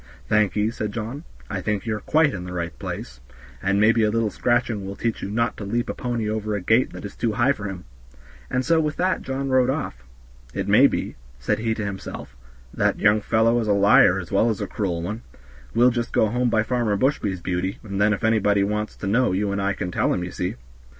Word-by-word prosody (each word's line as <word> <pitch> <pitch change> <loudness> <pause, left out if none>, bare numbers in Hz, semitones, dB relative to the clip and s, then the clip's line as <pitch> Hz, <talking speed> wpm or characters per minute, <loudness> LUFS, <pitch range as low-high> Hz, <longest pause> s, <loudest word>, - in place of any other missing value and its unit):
"Thank 105 -2 +2
ye," 105 +1 +1
said 105 -2 -4
John, 120 +8 -5 0.2
"I - - -4
think 105 -2 -2
you 110 -2 -1
are - - -4
quite 155 +2 +2
in 90 - -5
the 90 - -7
right 85 -2 -3
place, - - -6 0.4
and 100 +1 +1
maybe 115 +2 +4
a 105 - +3
little 110 -1 0
scratching 120 -3 0
will 100 +1 -6
teach 115 +1 -2
you - - -4
not 115 +3 0
to - - -6
leap 120 +4 -1
a - - -5
pony 120 -3 -3
over 110 0 -2
a - - -1
gate 110 +7 +2
that - - -8
is 100 - -8
too 115 -2 -1
high 125 +4 +3
for 105 -7 -4
him," 95 -3 -6 0.6
and 125 0 -1
so 165 -1 +3
with 150 -1 -1
that 185 +1 0
John 135 +1 -3
rode 130 -1 +3
off. 100 - -3 0.5
"It - - -2
may - - +7
be," - - -4 0.2
said - - -1
he 110 0 0
to 110 - -3
himself, 95 -8 -7 0.4
"that - - +1
young 105 +1 +4
fellow 115 +2 +2
is 110 - -2
a 105 - +3
liar 100 -2 +5
as 90 -3 -6
well 105 +4 +3
as 110 - -2
a - - -2
cruel 85 -5 -3
one; 105 +6 -4 0.5
we'll 120 +2 +5
just 120 -1 -2
go 110 - +2
home 125 +2 +1
by 110 -2 +2
Farmer 115 -4 0
Bushby's, 100 -6 0
Beauty, 90 +2 -2
and 100 -2 -3
then 105 +1 +4
if 105 - -2
anybody 105 -3 +3
wants 105 +1 -2
to - - -7
know 115 0 +2
you 100 +1 0
and 100 0 -1
I 100 +1 +1
can 90 -2 -4
tell - - +1
'em, 90 - -1
ye 90 - -5
see." 90 +3 -3
105 Hz, 240 wpm, -23 LUFS, 100-120 Hz, 0.6 s, may